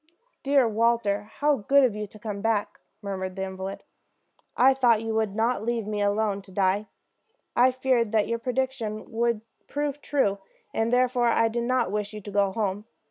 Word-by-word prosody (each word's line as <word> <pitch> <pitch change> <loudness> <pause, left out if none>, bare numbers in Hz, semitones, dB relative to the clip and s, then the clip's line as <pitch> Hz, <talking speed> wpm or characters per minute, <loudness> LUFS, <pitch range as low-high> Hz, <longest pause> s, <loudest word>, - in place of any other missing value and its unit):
"Dear 275 -3 +3
Walter, 220 -2 +1
how 295 -1 +2
good 275 +6 +4
of 240 -5 +2
you 210 0 -4
to 215 - -14
come 210 -2 -5
back!" 220 -2 -1 0.2
murmured 190 -2 -4
the 190 - -3
invalid. 190 0 -6 0.7
"I 265 +2 +6
thought 240 -4 +3
you 225 0 -2
would 220 -2 0
not 230 +2 +1
leave 235 -1 -1
me 210 0 -3
to 205 0 +1
die 190 0 +3
alone. 205 +1 -7 0.7
I 250 +2 +6
feared 255 -3 +1
that 215 -2 +2
your 230 0 -1
prediction 250 -3 -3
would 235 -1 0 0.3
prove 290 0 -3
true, 205 -11 +1 0.3
and 225 +1 0
therefore 250 -1 +3
I 230 -1 +3
did 235 +1 -2
not 250 -5 +1
wish 210 0 -3
you 210 - -7
to 205 - -8
go 200 -1 +2
home. 205 -1 -2
225 Hz, 185 wpm, -26 LUFS, 205-245 Hz, 0.7 s, I